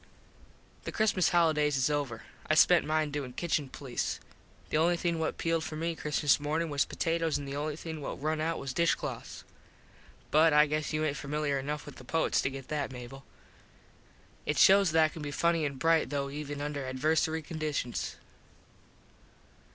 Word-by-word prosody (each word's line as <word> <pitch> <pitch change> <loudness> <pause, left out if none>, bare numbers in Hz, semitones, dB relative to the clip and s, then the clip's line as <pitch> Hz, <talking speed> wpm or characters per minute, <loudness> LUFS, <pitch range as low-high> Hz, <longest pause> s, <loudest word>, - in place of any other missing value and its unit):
The - - -3
Christmas 210 -5 +2
holidays 155 -4 +3
is 130 - +2
over. 130 -7 -2 0.3
I 155 - +4
spent 175 +2 +5
mine 155 -1 +1
doin 140 -4 -4
Kitchen 150 -2 -1
police. 130 -3 -3 0.5
The - - +2
only 170 +2 +3
thing 170 -1 -1
what 160 - -2
pealed 165 -1 0
for 155 - -5
me 165 +2 -1
Christmas 150 -2 +1
morning 155 +2 -1
was 140 -1 +2
potatoes 165 -1 0
an 145 - -6
the 140 0 -5
only 150 +1 -2
thing 160 -1 -7
what - - -5
rung 155 +2 -1
out 165 +1 0
was 135 -2 -5
dish 170 +1 +3
cloths. - - -7 0.9
But 160 +1 +5
I 150 0 +7
guess 155 0 -2
you 155 0 0
aint 145 -2 -1
familiar 145 -1 -1
enough 145 +2 -4
with 145 - -10
the - - -11
poets 160 +6 +1
to - - 0
get 135 -1 -8
that, 145 -3 -2
Mable. 125 +2 -9 1.2
It - - 0
shows 195 -1 +6
that 160 0 +5
I - - 0
can 160 - -9
be 145 - -4
funny 165 +1 +1
an 140 - -6
bright 165 +1 +2
though 140 -1 -2
even 145 0 -5
under 145 -1 -3
adversary 155 +4 0
conditions. 150 -6 -3
150 Hz, 180 wpm, -30 LUFS, 140-160 Hz, 1.2 s, I